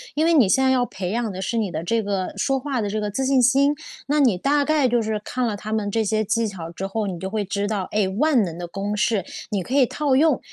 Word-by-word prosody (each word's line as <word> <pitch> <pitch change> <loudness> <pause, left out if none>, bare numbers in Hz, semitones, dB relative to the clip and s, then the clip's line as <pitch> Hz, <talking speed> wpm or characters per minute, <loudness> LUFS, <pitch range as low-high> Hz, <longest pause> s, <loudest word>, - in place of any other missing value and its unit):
因 310 +2 +2
为 335 - +4
你 255 -10 +5
现 265 +7 +3
在 265 - +4
要 250 -1 +2
培 185 -6 -5
养 230 0 -1
的， 190 0 -6
是 230 +4 -2
你 210 -5 -1
的 155 0 -4
这 230 +6 0
个 195 -2 -2
说 270 -1 +1
话 270 -2 -2
的 205 - -1
这 215 +1 -2
个 210 - -2
自 265 +5 -1
信 265 -1 +3
心， 275 +4 +4 0.3
那 295 +2 +1
你 245 -10 +4
大 285 +8 +2
概 300 -3 +2
就 240 -1 +2
是 220 -1 -2
看 250 -1 -1
了 205 -2 -2
他 215 +1 -5
们 210 -2 -1
这 225 +1 +1
些 215 +1 +1
技 230 +1 0
巧 170 -5 -7
之 185 +3 -5
后， 210 +1 -2
你 180 -3 -4
就 190 +2 -4
会 210 0 -1
知 200 +1 -2
道， 205 -3 -2
哎， 205 -2 +1
万 245 +4 +2
能 170 -2 -5
的 175 - -5
公 195 +4 -3
式， 210 -2 +1 0.2
你 200 -3 -1
可 250 - -6
以 275 -2 +5
套 285 +2 0
用。 295 -1 +3
220 Hz, 310 characters per minute, -22 LUFS, 195-260 Hz, 0.3 s, 你